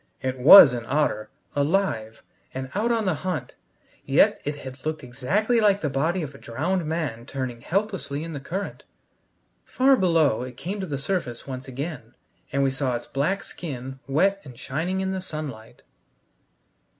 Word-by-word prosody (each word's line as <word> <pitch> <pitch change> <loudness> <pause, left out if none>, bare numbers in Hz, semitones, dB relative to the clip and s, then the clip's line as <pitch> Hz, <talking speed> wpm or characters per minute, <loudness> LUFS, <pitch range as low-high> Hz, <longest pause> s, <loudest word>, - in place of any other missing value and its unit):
It 130 0 -3
was 135 0 +10
an 120 -2 -3
otter, 135 -7 0 0.3
alive, 145 - 0 0.3
and 130 0 -5
out 220 +4 +1
on 225 -2 +1
the 185 - +2
hunt; 160 -5 -4 0.5
yet - - +3
it 145 +1 -2
had 130 -2 -10
looked 155 -1 -3
exactly 195 - 0
like 205 -2 +3
the 150 - -1
body 160 +6 0
of 145 -2 -6
a 140 - -13
drowned 160 +8 -2
man 145 -8 -3
turning 130 -4 -4
helplessly 190 - -2
in 165 0 -6
the 145 - -4
current. 190 +8 -5 0.8
Far 270 +1 +4
below 165 - +3
it 125 0 -7
came 195 +8 -4
to 190 - -3
the 145 -3 -3
surface 140 -5 -3
once 130 -1 -7
again, 130 -3 -6 0.4
and 140 0 +1
we 135 - +2
saw 130 -2 -1
its 120 - -5
black 170 +9 -1
skin, 135 -5 -7
wet 195 +8 +2
and 125 -4 -12
shining 160 +9 -2
in 190 0 -1
the 190 -1 -3
sunlight. 145 -10 -7
145 Hz, 170 wpm, -25 LUFS, 130-185 Hz, 0.8 s, was